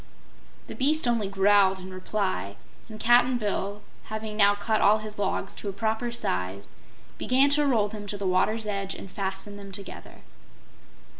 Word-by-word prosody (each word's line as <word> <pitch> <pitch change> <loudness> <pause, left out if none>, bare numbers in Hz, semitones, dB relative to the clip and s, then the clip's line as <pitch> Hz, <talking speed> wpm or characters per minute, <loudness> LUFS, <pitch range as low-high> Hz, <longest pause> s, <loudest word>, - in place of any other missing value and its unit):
The - - -8
beast 295 +1 +2
only 230 -4 +1
growled 195 -1 +4
in 185 0 -8
reply, 185 - -2 0.3
and 215 -1 -9
Cap'n 245 +2 +4
Bill, 205 -1 -3 0.2
having 215 0 -5
now 205 -1 +5
cut 215 +1 0
all 210 +2 +6
his 215 -1 -8
logs 205 - -1
to 205 - -5
a - - -5
proper 220 +3 -1
size, 95 - -3 0.5
began 270 +3 +4
to 295 0 +3
roll 225 -6 +3
them 205 -1 -8
to 205 - -4
the 200 - -4
water's 210 +4 +1
edge 195 -2 -3
and 190 - -9
fasten 195 +1 -4
them 200 -1 -10
together. 200 0 -9
205 Hz, 165 wpm, -27 LUFS, 195-220 Hz, 0.5 s, all